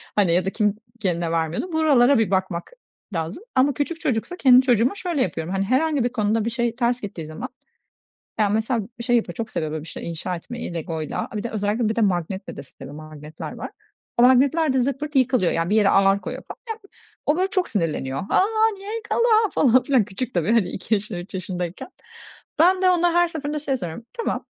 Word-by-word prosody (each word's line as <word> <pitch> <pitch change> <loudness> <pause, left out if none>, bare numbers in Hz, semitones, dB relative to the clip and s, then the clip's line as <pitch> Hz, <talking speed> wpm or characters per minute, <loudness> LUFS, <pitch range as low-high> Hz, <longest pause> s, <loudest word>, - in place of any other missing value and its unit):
hani, 195 -5 +3
ya 180 +1 +2
da 195 - +1
"Kim 210 -1 +1 0.2
kendine 175 -4 -1
vermiyordun?" 165 - -2
Buralara 280 -5 +4
bir 220 - +1
bakmak 185 - -1 0.4
lazım 165 - -4
ama 270 +2 +4
küçük 320 +5 -3
çocuksa, 300 +4 -1
kendi 255 -4 +7
çocuğuma 245 - +2
şöyle 350 -7 -2
yapıyorum, 165 -3 -2
hani, 195 0 0
herhangi 280 +4 +2
bir 245 - +1
konuda 220 -2 0
bir 230 - +1
şey 235 -1 -1
ters 240 0 0
gittiği 190 -6 -6
zaman 155 - -6 0.9
Ya, 210 -2 +3
mesela 220 +3 0 0.2
şey 240 0 +2
yapıyor, 220 -7 0
çok 225 +1 -4
seviyor, 155 -6 -3
böyle, 155 -1 -4
bir 165 - -11
şey - - -6
inşa 170 +2 -4
etmeyi 210 +1 -7
legoyla, 160 -2 -3
a, 215 - -4
bir - - -4
de 235 - -3
özellikle 215 +2 0
bir 220 - -1
de 230 - +1
magnetle 190 -1 -1
de - - -7
seviyor. 140 +1 -12
Magnetler 155 0 -9
var. - - -7 0.5
O 240 - +5
magnetler 270 +4 +4
de 265 - +2
zırt 265 +2 0
pırt 300 0 -6
yıkılıyor, 255 -7 +3
yani, 165 +1 -1
bir 210 - +2
yere 205 -2 +4
ağır 195 0 +4
koyuyor, 255 +1 -6
falan. - - -8
Ya, 445 0 -4 0.5
o, 300 +3 +2
böyle, 375 - +2
çok 370 -2 0
sinirleniyor. 155 -9 -1
"A, - - +5 0.4
niye 405 +3 -6
yıkıldı?" 465 +1 -1 0.3
falan 255 -1 +4
filan. 255 -3 +3
Küçük 250 +7 -5
tabii, 175 +3 +1
hani, 230 -5 +3
2 195 +4 -3
yaşında, 200 -4 -1
3 175 +4 -10
yaşındayken. 180 - -4 0.7
Ben 365 +3 +5
de 370 - +5
ona 350 -1 +3
her 345 0 +4
seferinde 300 -2 -4
şey 275 -2 -1
soruyorum, 175 +2 -6
"Tamam, 465 - -3
225 Hz, 210 wpm, -23 LUFS, 180-270 Hz, 0.9 s, kendi